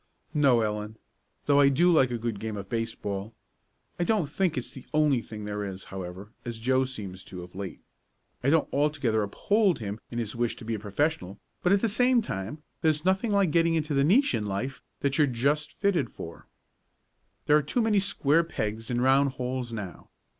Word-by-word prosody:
"No, 140 Hz, -6 st, +4 dB
Ellen. 105 Hz, 0 st, -3 dB, 0.5 s
Though 145 Hz, 0 st, +4 dB
I 140 Hz, -1 st, +7 dB
do 175 Hz, +6 st, +4 dB
like 135 Hz, -5 st, +5 dB
a 120 Hz, -, -2 dB
good 115 Hz, -3 st, -3 dB
game 110 Hz, -1 st, -4 dB
of 100 Hz, -1 st, -6 dB
baseball. 110 Hz, -2 st, -3 dB, 0.6 s
I -, -, +2 dB
don't 210 Hz, -2 st, +2 dB
think 165 Hz, +3 st, -1 dB
it's 125 Hz, -, -4 dB
the 130 Hz, -, -12 dB
only 150 Hz, -5 st, +3 dB
thing 105 Hz, -2 st, -8 dB
there 105 Hz, 0 st, -3 dB
is, 95 Hz, -1 st, -6 dB
however, 95 Hz, +2 st, -7 dB
as 120 Hz, -1 st, -5 dB
Joe 130 Hz, +3 st, +2 dB
seems 100 Hz, -7 st, -7 dB
to, 90 Hz, -2 st, -8 dB
of 90 Hz, -, -13 dB
late. 95 Hz, -1 st, -6 dB, 0.6 s
I 135 Hz, -, +3 dB
don't 160 Hz, +1 st, +3 dB
altogether 140 Hz, -7 st, +1 dB
uphold 195 Hz, -, +2 dB
him 105 Hz, -1 st, -5 dB
in 120 Hz, -, -6 dB
his 115 Hz, -2 st, -3 dB
wish 120 Hz, -1 st, 0 dB
to 115 Hz, -, -11 dB
be 115 Hz, -, -2 dB
a 110 Hz, -, -2 dB
professional, 105 Hz, -, -1 dB, 0.2 s
but, 180 Hz, -, +2 dB
at 200 Hz, 0 st, +4 dB
the 230 Hz, -, +2 dB
same 245 Hz, +3 st, +3 dB
time, 110 Hz, -, -5 dB, 0.2 s
there's 155 Hz, 0 st, +1 dB
nothing 190 Hz, +4 st, +2 dB
like 200 Hz, -5 st, +3 dB
getting 165 Hz, +1 st, +3 dB
into 155 Hz, -1 st, -1 dB
the 140 Hz, 0 st, +3 dB
niche 210 Hz, -, +4 dB
in 110 Hz, -3 st, -1 dB
life 120 Hz, +8 st, -3 dB, 0.2 s
that 140 Hz, +1 st, 0 dB
you're 150 Hz, -, +5 dB
just 140 Hz, +4 st, 0 dB
fitted 175 Hz, -, 0 dB
for. 85 Hz, 0 st, -9 dB, 1.0 s
"There 150 Hz, -, +5 dB
are -, -, +2 dB
too 190 Hz, -, 0 dB
many 215 Hz, -2 st, +3 dB
square 170 Hz, -5 st, +3 dB
pegs 110 Hz, -8 st, -4 dB
in 120 Hz, -1 st, 0 dB
round 135 Hz, +1 st, +4 dB
holes 125 Hz, -1 st, -3 dB
now. 105 Hz, -6 st, -7 dB
130 Hz, 200 wpm, -28 LUFS, 105-155 Hz, 1.0 s, I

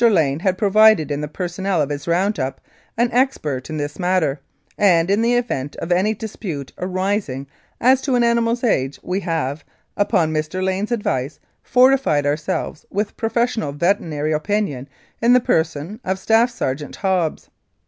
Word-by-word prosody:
Lane 155 Hz, -8 st, +2 dB
had 185 Hz, 0 st, 0 dB
pro 200 Hz, -1 st, 0 dB
vided 215 Hz, -8 st, +5 dB
in 145 Hz, 0 st, -2 dB
the 150 Hz, -, -3 dB
personnel 180 Hz, +3 st, -2 dB
of 145 Hz, -1 st, 0 dB
his 145 Hz, +2 st, -5 dB
round 185 Hz, +3 st, +1 dB
up 135 Hz, 0 st, -3 dB, 0.4 s
an 235 Hz, +1 st, +2 dB
expert 165 Hz, -, 0 dB
in 155 Hz, -, -4 dB
this 145 Hz, +2 st, -4 dB
matter, 175 Hz, -6 st, +1 dB, 0.4 s
and, 175 Hz, -3 st, +3 dB
in 205 Hz, +2 st, +3 dB
the 235 Hz, +1 st, +2 dB
event 145 Hz, -, -2 dB
of 170 Hz, -, -5 dB
any 195 Hz, +5 st, +2 dB
dispute 185 Hz, -, -6 dB
arising 185 Hz, -7 st, -2 dB, 0.3 s
as 255 Hz, +2 st, +4 dB
to 265 Hz, -2 st, 0 dB
an 240 Hz, -, +3 dB
animal's 235 Hz, +1 st, +1 dB
age, 135 Hz, -, 0 dB
we 185 Hz, +2 st, -1 dB
have, 160 Hz, -5 st, -2 dB, 0.3 s
upon 180 Hz, -6 st, +1 dB
Mr. 155 Hz, +4 st, -2 dB
Lane's 190 Hz, +4 st, -1 dB
advice, 145 Hz, -, -2 dB, 0.2 s
fortified 255 Hz, -, +3 dB
ourselves 150 Hz, +1 st, -2 dB
with 205 Hz, +1 st, -2 dB
professional 225 Hz, -, -1 dB
veterinary 155 Hz, -2 st, 0 dB
opinion 155 Hz, -5 st, -2 dB, 0.3 s
in 235 Hz, +2 st, +5 dB
the 250 Hz, -, +7 dB
person 160 Hz, 0 st, -1 dB
of 190 Hz, +1 st, -1 dB
Staff 225 Hz, +5 st, +3 dB
Sergeant 145 Hz, -, -4 dB
Hobbs. 185 Hz, -5 st, -1 dB
185 Hz, 160 wpm, -20 LUFS, 150-220 Hz, 0.4 s, the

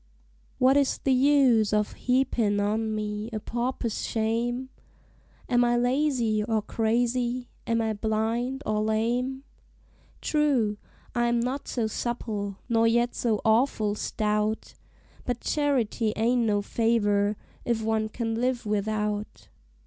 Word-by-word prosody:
What 260 Hz, +2 st, +4 dB
is 280 Hz, -2 st, +2 dB
the 270 Hz, -, +1 dB
use 255 Hz, -5 st, +4 dB
of 210 Hz, 0 st, +1 dB
heapin' 245 Hz, -5 st, +1 dB
on 215 Hz, +2 st, 0 dB
me 210 Hz, +1 st, -3 dB
a 215 Hz, -, -3 dB
pauper's 235 Hz, 0 st, -3 dB
shame? 235 Hz, +3 st, -1 dB, 0.8 s
Am 245 Hz, -1 st, +3 dB
I 240 Hz, 0 st, +2 dB
lazy 245 Hz, -4 st, +1 dB
or 220 Hz, -1 st, 0 dB
crazy? 240 Hz, +3 st, 0 dB, 0.2 s
am 230 Hz, 0 st, +1 dB
I 220 Hz, -1 st, 0 dB
blind 225 Hz, +5 st, -1 dB
or 215 Hz, 0 st, 0 dB
lame? 240 Hz, +5 st, 0 dB, 0.8 s
True, 270 Hz, -9 st, +1 dB, 0.4 s
I 240 Hz, -1 st, +1 dB
am 235 Hz, 0 st, +2 dB
not 260 Hz, +4 st, -2 dB
so 235 Hz, -3 st, -1 dB
supple, 215 Hz, -3 st, -3 dB
nor 230 Hz, -2 st, +3 dB
yet 235 Hz, +1 st, +2 dB
so 220 Hz, -4 st, 0 dB
awful 220 Hz, -2 st, +2 dB
stout; 210 Hz, +1 st, -1 dB, 0.5 s
But 245 Hz, -1 st, -2 dB
charity 250 Hz, -7 st, 0 dB
ain't 235 Hz, +2 st, +2 dB
no 205 Hz, -1 st, +1 dB
favor, 205 Hz, -2 st, +1 dB, 0.3 s
if 230 Hz, -2 st, -1 dB
one 220 Hz, 0 st, 0 dB
can 225 Hz, 0 st, -3 dB
live 245 Hz, +1 st, -1 dB
without. 210 Hz, -, -2 dB
230 Hz, 125 wpm, -27 LUFS, 215-245 Hz, 0.8 s, What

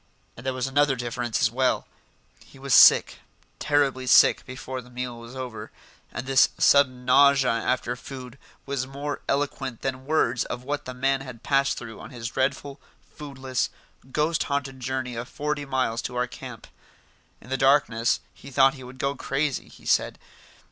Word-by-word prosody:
And 115 Hz, -, -12 dB
there 130 Hz, 0 st, -1 dB
was 130 Hz, -1 st, -1 dB
another 140 Hz, 0 st, +2 dB
difference 120 Hz, -1 st, -2 dB
as 115 Hz, -, +3 dB
well: 130 Hz, +1 st, +1 dB, 0.6 s
he -, -, -18 dB
was 135 Hz, -1 st, -2 dB
sick, -, -, +7 dB, 0.4 s
terribly 140 Hz, -3 st, +1 dB
sick -, -, +6 dB
before 130 Hz, 0 st, -6 dB
the 125 Hz, -, -17 dB
meal 125 Hz, -1 st, -5 dB
was 115 Hz, +2 st, -11 dB
over, 125 Hz, -4 st, -7 dB, 0.4 s
and -, -, -5 dB
this 135 Hz, 0 st, +5 dB
sudden 130 Hz, -3 st, +4 dB
nausea 135 Hz, 0 st, +5 dB
after 120 Hz, +1 st, -1 dB
food 130 Hz, 0 st, -10 dB, 0.3 s
was 135 Hz, -2 st, -3 dB
more 140 Hz, +2 st, -5 dB
eloquent 135 Hz, -3 st, -2 dB
than 130 Hz, 0 st, -4 dB
words 125 Hz, -6 st, +2 dB
of 125 Hz, -, -6 dB
what 145 Hz, +2 st, -3 dB
the 130 Hz, -, -7 dB
man 135 Hz, +1 st, +1 dB
had 125 Hz, -3 st, -10 dB
passed 135 Hz, -1 st, +2 dB
through 115 Hz, -3 st, -8 dB
on -, -, -10 dB
his 120 Hz, -2 st, -6 dB
dreadful, 135 Hz, +2 st, -2 dB, 0.3 s
foodless, 135 Hz, -3 st, -3 dB, 0.4 s
ghost 155 Hz, +3 st, 0 dB
haunted 140 Hz, -2 st, -3 dB
journey 130 Hz, 0 st, -3 dB
of 120 Hz, +2 st, -6 dB
forty 150 Hz, 0 st, -3 dB
miles 130 Hz, -4 st, -1 dB
to 125 Hz, -, -6 dB
our 125 Hz, 0 st, +1 dB
camp. -, -, -10 dB, 0.7 s
In 125 Hz, -, -15 dB
the -, -, +1 dB
darkness 135 Hz, -4 st, +2 dB
he -, -, -13 dB
thought 135 Hz, 0 st, +4 dB
he 130 Hz, -2 st, -11 dB
would 125 Hz, +1 st, -11 dB
go 140 Hz, +1 st, -1 dB
crazy, 140 Hz, +1 st, -2 dB
he -, -, -17 dB
said. -, -, +1 dB
130 Hz, 170 wpm, -25 LUFS, 125-140 Hz, 0.7 s, sick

